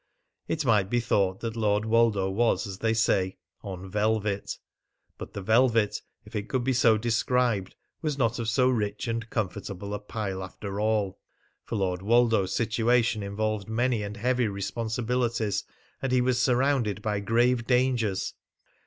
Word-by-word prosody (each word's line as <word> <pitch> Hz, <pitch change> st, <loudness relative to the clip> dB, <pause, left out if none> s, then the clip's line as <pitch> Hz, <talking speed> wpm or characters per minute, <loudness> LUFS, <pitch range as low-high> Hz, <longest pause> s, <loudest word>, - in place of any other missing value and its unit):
It 155 Hz, -2 st, -1 dB
might 105 Hz, -5 st, +3 dB
be 120 Hz, -, +2 dB
thought 100 Hz, -5 st, +1 dB
that 115 Hz, -1 st, -3 dB
Lord 105 Hz, -1 st, +1 dB
Woldo 110 Hz, -4 st, +3 dB
was, 115 Hz, +5 st, +1 dB
as 95 Hz, -2 st, -7 dB
they 115 Hz, 0 st, +1 dB
say, 95 Hz, -4 st, +1 dB, 0.2 s
on 95 Hz, -2 st, -7 dB
velvet. 105 Hz, 0 st, -1 dB, 0.6 s
But -, -, -8 dB
the 100 Hz, -, -5 dB
velvet, 115 Hz, 0 st, +3 dB, 0.2 s
if -, -, -12 dB
it 105 Hz, -1 st, -3 dB
could 130 Hz, -2 st, 0 dB
be 130 Hz, +1 st, +1 dB
so 115 Hz, -3 st, +4 dB
described, 115 Hz, -2 st, 0 dB, 0.3 s
was 150 Hz, -3 st, -1 dB
not 115 Hz, -2 st, +1 dB
of 115 Hz, -1 st, -1 dB
so 125 Hz, +3 st, +3 dB
rich 105 Hz, -3 st, -1 dB
and 115 Hz, 0 st, -3 dB
comfortable 100 Hz, -1 st, -4 dB
a 105 Hz, -, -2 dB
pile 100 Hz, -2 st, -4 dB
after 100 Hz, +2 st, -6 dB
all; 105 Hz, -3 st, 0 dB, 0.5 s
for -, -, -4 dB
Lord 95 Hz, -3 st, -1 dB
Woldo's 115 Hz, -2 st, +3 dB
situation 115 Hz, 0 st, +2 dB
involved 105 Hz, 0 st, -2 dB
many 120 Hz, 0 st, +1 dB
and 105 Hz, +1 st, -5 dB
heavy 125 Hz, +1 st, +1 dB
responsibilities, 115 Hz, +2 st, -1 dB, 0.4 s
and 135 Hz, -, -1 dB
was 125 Hz, -1 st, +2 dB
surrounded 125 Hz, -6 st, +1 dB
by 105 Hz, -2 st, 0 dB
grave 120 Hz, +3 st, +2 dB
dangers. 125 Hz, -6 st, +1 dB
110 Hz, 155 wpm, -27 LUFS, 100-120 Hz, 0.6 s, so